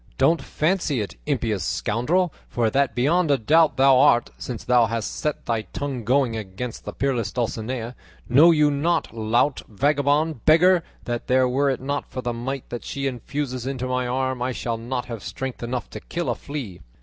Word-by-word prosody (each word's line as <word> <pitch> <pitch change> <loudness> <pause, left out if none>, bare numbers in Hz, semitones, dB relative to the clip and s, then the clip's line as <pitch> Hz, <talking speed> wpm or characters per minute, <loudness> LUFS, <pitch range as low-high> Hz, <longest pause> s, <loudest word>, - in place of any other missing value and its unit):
Don't 155 +3 +3
fancy 155 -2 0
it, 105 - -4
impious 115 - 0
scoundrel, 150 - 0 0.2
for 115 -2 0
that 135 -3 +1
beyond 155 +7 +2
a 140 - +4
doubt 155 +7 +3
thou 135 -1 +6
art, 130 -4 +4
since 120 -4 -6
thou 120 -2 +4
hast 115 0 -3
set 150 -1 -3
thy 115 -2 0
tongue 125 +5 -5
going 125 0 +2
against 110 +3 -6
the - - -4
peerless 130 -5 -1
Dulcinea. 120 0 -3 0.3
Know 145 +8 +7
you 150 -3 +4
not, 160 +1 0
lout, 115 +5 +1
vagabond, 145 +4 +1
beggar, 170 +3 +5 0.2
that 120 -1 -4
were 130 +2 +3
it 130 - -2
not 140 +2 -3
for 130 - -6
the 120 - -1
might 130 +3 -4
that 120 - -5
she 140 0 -4
infuses 130 0 -3
into 130 -2 -3
my 125 0 -1
arm 130 0 -1
I 125 +1 -1
should 115 -1 -3
not 125 +2 -3
have 115 -4 -7
strength 130 +4 -5
enough 120 +1 -3
to - - -6
kill 175 -1 -3
a - - -2
flea? 130 -11 -7
130 Hz, 185 wpm, -23 LUFS, 120-145 Hz, 0.3 s, Know